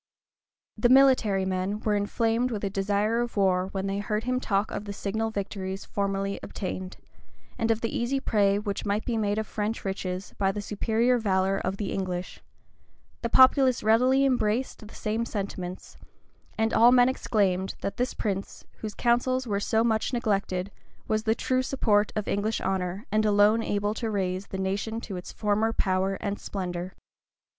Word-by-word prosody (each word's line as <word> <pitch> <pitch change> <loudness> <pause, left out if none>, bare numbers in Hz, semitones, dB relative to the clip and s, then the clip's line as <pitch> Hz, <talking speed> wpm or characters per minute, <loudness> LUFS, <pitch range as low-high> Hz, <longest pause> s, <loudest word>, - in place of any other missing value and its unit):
The 240 - +4
military 255 -8 +5
men 190 +2 -1
were 215 - 0
inflamed 225 +4 +1
with 215 -4 -4
a 200 - -1
desire 205 +4 +1
of 240 -2 -4
war 185 -2 +2
when 195 -1 -3
they 195 0 -1
heard 210 +1 -2
him 255 +1 0
talk 200 -3 0
of 210 - -4
the 200 - -5
signal 220 +3 -2
victories 195 -2 -4
formerly 195 0 -2
obtained, 185 -1 -5 0.6
and 225 - 0
of 225 0 +1
the 230 - -2
easy 260 +3 0
prey 200 -6 +2
which 205 -1 -3
might 205 +1 -1
be 240 - -1
made 210 -1 0
of 220 - -1
French 215 +1 -3
riches 190 -1 -4
by 195 -1 +2
the 205 - -5
superior 225 +4 +1
valor 195 -2 +1
of 190 +1 -3
the 200 -2 -3
English; 185 -2 -4 0.8
the 235 - -2
populace 260 0 +5
readily 255 +5 +4
embraced 245 -3 0
the - - -14
same 220 +1 -1
sentiments; 190 -4 -5 0.6
and 220 +1 +1
all 235 +2 +7
men 250 -1 +6
exclaimed, 195 -7 0
that 200 - -3
this 250 +1 -1
prince, 195 -2 -4
whose 215 -1 -6
counsels 255 +2 +1
were 205 -4 -1
so 220 +2 +1
much 225 +2 0
neglected, 200 -5 -1 0.4
was 215 +1 0
the 220 0 +2
true 255 +2 0
support 215 -6 +1
of 210 -2 -2
English 210 +2 0
honor 190 +2 -2
and 215 0 +2
alone 210 +1 +4
able 205 -1 -1
to 225 +1 -3
raise 190 -2 -2
the 190 - -5
nation 200 +4 -2
to 205 -4 -7
its 180 - -7
former 215 +1 +1
power 190 -2 0
and 200 +1 -4
splendor. 180 -2 -5
210 Hz, 175 wpm, -27 LUFS, 195-225 Hz, 0.8 s, all